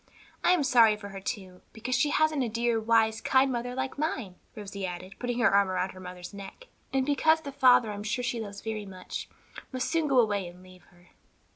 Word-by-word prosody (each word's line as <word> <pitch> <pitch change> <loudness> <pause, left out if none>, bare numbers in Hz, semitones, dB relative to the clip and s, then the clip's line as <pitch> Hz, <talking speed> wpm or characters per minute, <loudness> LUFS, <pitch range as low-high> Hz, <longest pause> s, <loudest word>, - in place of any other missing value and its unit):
I 360 - +5
am 345 -5 +2
sorry 230 -5 +5
for 200 -1 -9
her, 195 0 -7
too, 185 -2 -6
because 235 +3 -4
she 290 +4 +3
hasn't 310 -2 +2
a 240 - -2
dear, 235 +1 0
wise, 220 0 +2
kind 265 0 +3
mother 245 0 -3
like 265 +1 -3
mine," 265 - -2 0.2
Rosie 200 -2 -7
added, 185 +1 -5
putting 245 -1 -2
her 235 -4 +3
arms 200 -1 +4
about 185 0 -1
her 185 - -13
mother's 180 0 -9
neck, 200 - -10 0.2
"and 265 -1 +1
because 315 +3 +3
the 285 -3 -7
father, 250 -4 +5
I - - -4
am 205 - -6
sure 245 +4 -2
she 240 -1 -2
loves 200 -2 -7
very 215 -2 -4
much, 185 -1 -7 0.4
must 255 -1 -2
soon 325 -2 +1
go 270 -2 +2
away 205 -5 +1
and 180 +1 -13
leave 185 -1 -16
her." 175 0 -23
225 Hz, 225 wpm, -28 LUFS, 195-260 Hz, 0.4 s, I